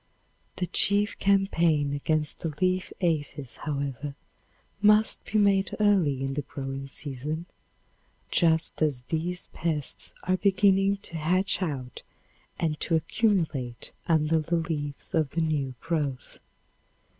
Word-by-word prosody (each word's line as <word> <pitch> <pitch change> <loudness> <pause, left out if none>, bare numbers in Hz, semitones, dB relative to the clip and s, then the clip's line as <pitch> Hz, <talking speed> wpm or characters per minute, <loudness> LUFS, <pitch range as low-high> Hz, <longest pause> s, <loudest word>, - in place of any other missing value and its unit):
The 180 - -1
chief 205 +3 +1
campaign 170 -7 +2
against 150 +1 -1
the 165 - -2
leaf 185 0 +1
aphis, 145 -7 -1
however, 140 -1 -3 0.7
must 210 +1 +4
be 215 - -1
made 200 -2 +3
early 180 -11 +3
in 135 0 -2
the 145 - -1
growing 135 0 -6
season, 145 +4 -4 0.9
just 160 -2 +2
as 145 -5 +1
these 175 +3 -2
pests 155 -4 -2
are 185 0 +1
beginning 195 0 +3
to 170 - -6
hatch 185 +6 +1
out 135 -8 -4 0.6
and 155 -3 -1
to 165 - +1
accumulate 160 - 0 0.2
under 160 -1 +3
the 160 +3 -1
leaves 150 -4 -3
of 155 -3 +2
the - - +3
new 145 -5 -1
growth. 150 -6 -2
160 Hz, 120 wpm, -27 LUFS, 145-185 Hz, 0.9 s, must